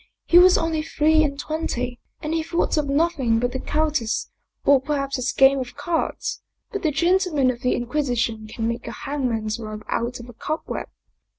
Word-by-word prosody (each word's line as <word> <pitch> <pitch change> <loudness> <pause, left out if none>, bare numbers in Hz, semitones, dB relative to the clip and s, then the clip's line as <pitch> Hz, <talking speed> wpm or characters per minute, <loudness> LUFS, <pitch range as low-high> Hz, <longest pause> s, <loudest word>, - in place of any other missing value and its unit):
He 350 - +7
was 365 0 +7
only 325 -1 0
three 315 0 +3
and 280 -2 -2
twenty, 250 -6 -3 0.2
and 305 +1 -3
he 325 - +1
thought 335 +2 0
of 300 -2 0
nothing 275 -6 +2
but 245 +1 0
the 260 - -3
countess 300 -7 -1 0.3
or 280 -2 +6
perhaps 275 -1 -1
his 255 0 -1
game 270 0 +5
of 250 -1 -6
cards. 325 +3 -2 0.3
But 405 - -3
the 315 - +2
gentlemen 340 -4 +2
of 240 -1 -9
the 250 - +1
Inquisition 240 -4 -1
can 225 +1 -3
make 235 +1 -3
a - - -4
hang 275 -2 -1
man's 220 -1 -2
rope 215 -1 -7
out 240 +1 -2
of 240 - -10
a 245 - -11
cobweb." 310 +7 -4
275 Hz, 190 wpm, -23 LUFS, 245-315 Hz, 0.3 s, He